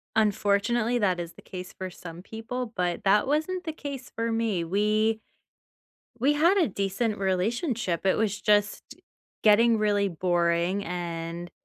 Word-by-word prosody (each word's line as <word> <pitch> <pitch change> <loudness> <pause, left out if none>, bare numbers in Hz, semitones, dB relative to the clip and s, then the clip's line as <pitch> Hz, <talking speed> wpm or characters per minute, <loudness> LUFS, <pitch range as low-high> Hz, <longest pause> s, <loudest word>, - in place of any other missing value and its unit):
unfortunately, 215 +3 +2
that 185 -5 +1
is 170 -1 -6
the - - -15
case 180 -1 -8
for 185 0 -4
some 175 -1 -10
people, 225 +3 -5
but 180 -2 -1
that 205 +1 +4
wasn't 315 +6 0
the 320 - -3
case 280 -4 -7
for 230 0 -1
me. 225 -6 0
We 215 +5 +1 1.0
we 275 +5 +3
had 335 +7 +4
a 340 - +3
decent 200 +2 -2
relationship. 195 - -1
It 190 - +3
was 210 -2 -1
just 205 0 +2 0.6
getting 225 +2 +5
really 205 -2 +1
boring, 175 +2 +1
and 170 -1 -5
205 Hz, 145 wpm, -27 LUFS, 180-230 Hz, 1.0 s, getting